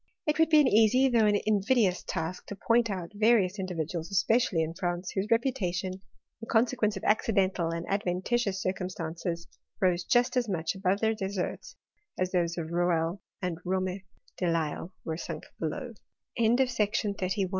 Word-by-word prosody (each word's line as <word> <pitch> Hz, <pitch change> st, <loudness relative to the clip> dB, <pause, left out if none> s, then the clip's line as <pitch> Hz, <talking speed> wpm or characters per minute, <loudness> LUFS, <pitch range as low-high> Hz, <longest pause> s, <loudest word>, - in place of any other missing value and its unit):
II 300 Hz, -, +4 dB
would 320 Hz, -1 st, +5 dB
be 310 Hz, -1 st, +6 dB
an 285 Hz, -, +3 dB
easy, 250 Hz, +4 st, +5 dB
though 230 Hz, -3 st, +4 dB
an 205 Hz, -1 st, +3 dB
invidious 210 Hz, -2 st, +2 dB
task, 175 Hz, +3 st, -4 dB
to 205 Hz, -, -6 dB
poiill 230 Hz, +3 st, +2 dB
out 180 Hz, -4 st, -4 dB
vai'ious 210 Hz, -2 st, +3 dB
individuals, 170 Hz, -2 st, -3 dB
especially 195 Hz, -3 st, +2 dB
in 160 Hz, +1 st, -4 dB
France, 175 Hz, +1 st, -3 dB
whoiif. 195 Hz, +2 st, -1 dB
reputation, 195 Hz, -7 st, 0 dB
in 200 Hz, +4 st, -15 dB
consequence 225 Hz, -2 st, +2 dB
of -, -, -8 dB
accidental 195 Hz, -5 st, +2 dB
and 165 Hz, +1 st, -3 dB
adventitf 195 Hz, +4 st, 0 dB
tious 195 Hz, -, 0 dB
circumstances, 175 Hz, -3 st, -3 dB, 0.3 s
rose 180 Hz, -3 st, +2 dB
just 245 Hz, +6 st, +2 dB
as 245 Hz, -3 st, +1 dB
much 165 Hz, -4 st, -1 dB
above 190 Hz, +1 st, 0 dB
their 220 Hz, 0 st, +3 dB
deserts, 195 Hz, -3 st, -4 dB, 0.4 s
as 185 Hz, 0 st, -1 dB
those 170 Hz, -2 st, 0 dB
of 165 Hz, -1 st, -4 dB
Rouelle, 175 Hz, +1 st, 0 dB, 0.2 s
and 175 Hz, -2 st, -2 dB
Rome 185 Hz, +1 st, -1 dB, 0.4 s
de 180 Hz, -, 0 dB
Lisle 165 Hz, +1 st, -2 dB
wefi 160 Hz, 0 st, -3 dB
sunk -, -, -6 dB, 0.2 s
below. 235 Hz, -, -4 dB
190 Hz, 155 wpm, -29 LUFS, 175-220 Hz, 0.4 s, be